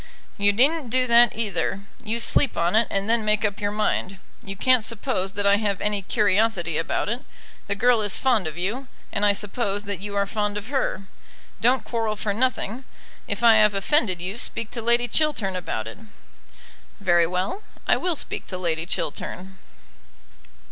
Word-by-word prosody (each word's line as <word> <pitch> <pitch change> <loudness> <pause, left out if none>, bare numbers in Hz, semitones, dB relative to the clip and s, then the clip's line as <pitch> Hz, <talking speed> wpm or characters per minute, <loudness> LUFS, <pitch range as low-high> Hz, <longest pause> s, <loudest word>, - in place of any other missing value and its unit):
"You 205 0 +3
needn't 270 +5 +2
do 255 +2 +3
that 235 -1 +5
either. 200 -3 -1 0.2
You 225 +2 -1
sleep 255 +2 +1
on 170 +4 +1
it, 225 +1 +4
and 195 0 -1
then 230 0 +3
make 215 0 +1
up 205 -1 -2
your 205 - 0
mind. 205 -2 -1 0.3
You 195 0 -6
can't 255 +3 +3
suppose 210 -4 -2
that 205 0 0
I 200 0 +5
have 205 -2 -1
any 210 -1 0
curiosity 200 -5 +1
about 165 - -2
it. 240 +5 -3 0.4
The 200 - -1
girl 240 +2 +3
is 205 -2 +2
fond 235 -9 +1
of 155 +1 -7
you, 220 +10 -3 0.2
and 205 - -2
I 205 -1 +5
suppose 205 0 -2
that 200 -2 -3
you 205 +1 -5
are 200 0 +1
fond 210 0 -2
of 210 +3 -7
her. 270 -7 -1 0.6
Don't 245 +1 +3
quarrel 225 -2 -2
for 210 -1 -2
nothing. 255 +1 -1 0.4
If - - -4
I 230 -2 +7
have 210 -1 +4
offended 195 - +1
you, 190 +6 -3
speak 230 -3 -2
to 235 - -4
Lady 235 +1 +2
Chiltern 245 -9 +1
about 140 -11 -4
it." 115 - -9 1.0
"Very 175 -4 +3
well; 185 - -2 0.3
I - - +5
will 355 -2 0
speak - - -3
to 185 - -4
Lady 170 -2 -2
Chiltern." 190 +2 -4
210 Hz, 180 wpm, -23 LUFS, 195-235 Hz, 1.0 s, I